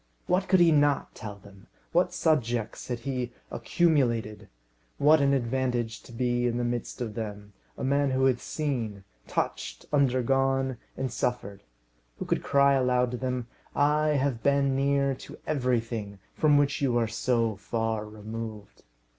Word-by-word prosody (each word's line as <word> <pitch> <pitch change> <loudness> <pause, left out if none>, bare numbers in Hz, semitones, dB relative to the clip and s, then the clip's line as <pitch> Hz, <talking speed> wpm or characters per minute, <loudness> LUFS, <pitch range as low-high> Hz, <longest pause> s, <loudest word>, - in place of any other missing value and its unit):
What 185 +2 +1
could 190 - +4
he 170 -1 +6
not 145 -1 +2
tell 105 -2 -7
them? 100 0 -17 0.2
What 175 +2 +2
subjects 120 -8 0
he 125 +2 -3
had 120 - -3 0.2
accumulated! 120 -10 +1 0.5
What 150 +1 +5
an 140 0 +3
advantage 125 -3 -1
to - - -15
be 120 +1 0
in 120 0 -1
the 120 - -1
midst 120 0 -3
of 115 -3 -3
them, 105 -2 -6 0.2
a - - -5
man 140 +1 +2
who 130 0 +2
had 130 -2 +3
seen, 120 -10 -3 0.2
touched, - - -3
undergone, 135 -1 +2 0.2
and 130 -3 -2
suffered; 105 -5 -2 0.6
who - - -5
could - - 0
cry 140 0 +4
aloud 125 -2 +2
to 125 - -3
them, 125 -1 -2 0.3
"I 150 +1 +3
have 130 -4 -1
been 140 -1 +2
near 140 0 +2
to - - -11
everything, 115 -7 -1 0.2
from 150 -2 +4
which 145 -1 +1
you 125 -4 +2
are 115 -1 +2
so 115 -1 0
far 110 +1 -2
removed." 110 0 -8
125 Hz, 155 wpm, -28 LUFS, 115-140 Hz, 0.6 s, he